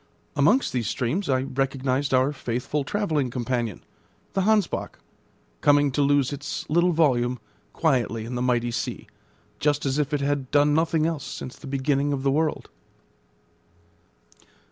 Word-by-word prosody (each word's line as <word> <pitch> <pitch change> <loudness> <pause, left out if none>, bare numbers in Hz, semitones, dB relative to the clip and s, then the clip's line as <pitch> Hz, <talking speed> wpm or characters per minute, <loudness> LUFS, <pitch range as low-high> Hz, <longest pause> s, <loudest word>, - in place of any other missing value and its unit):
Amongst 170 - +3
these 120 -4 -1
streams 150 +9 -1
I 130 -1 +2
recognised 135 0 -1
our 130 +2 +3
faithful 125 +3 -2
travelling 155 -7 -1
companion, 120 -4 -2 0.5
the 195 - +1
Hansbach, 210 -2 +1 0.6
coming 145 -1 +4
to 145 - 0
lose 140 -1 +2
its 145 0 -5
little 175 +3 +4
volume 125 -7 +2 0.3
quietly 120 -8 0
in 120 - -6
the 125 - -2
mighty 120 -1 +1
sea, 115 - -4 0.5
just 145 -1 +1
as 135 +2 0
if 145 -2 0
it 145 -1 0
had 140 -2 -1
done 145 0 +4
nothing 160 0 +2
else 165 -3 -2
since 130 - -7
the 145 - -12
beginning 140 +1 0
of 135 -1 -3
the 135 - +2
world. 155 +2 -1
140 Hz, 145 wpm, -25 LUFS, 130-150 Hz, 0.6 s, coming